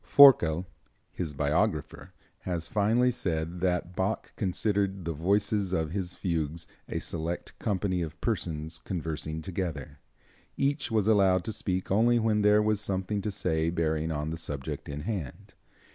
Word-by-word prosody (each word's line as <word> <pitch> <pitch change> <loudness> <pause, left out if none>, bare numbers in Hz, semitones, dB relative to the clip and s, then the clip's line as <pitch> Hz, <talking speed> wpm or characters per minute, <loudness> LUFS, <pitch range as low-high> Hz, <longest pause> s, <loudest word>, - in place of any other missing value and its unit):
Forkel, 95 - +7 0.5
his 80 -5 -4
biographer, 70 +1 0 0.3
has 85 -3 -3
finely 115 +5 +3
said 85 -6 -2
that 90 0 -1
Bach 95 +4 -2
considered 100 -1 0
the 85 - -1
voices 100 +4 +1
of 80 -3 0
his 90 -2 -3
fugues 80 -2 -2 0.2
a - - -2
select 85 +1 -4
company 95 -3 0
of 80 0 -5
persons 80 -6 -2
conversing 80 -2 -4
together. 85 -7 -4 0.6
Each 140 +1 0
was 110 -3 +1
allowed 95 -4 +4
to 110 - -4
speak 95 -2 -2
only 115 +4 +4
when 110 -2 +2
there 105 +1 +5
was 105 -1 +1
something 95 +1 -1
to 105 - -2
say 80 -4 0
bearing 80 -1 0
on 75 0 -2
the 80 - -5
subject 70 -4 -5
in 70 +1 -4
hand. 95 - -5
90 Hz, 145 wpm, -29 LUFS, 80-105 Hz, 0.6 s, Forkel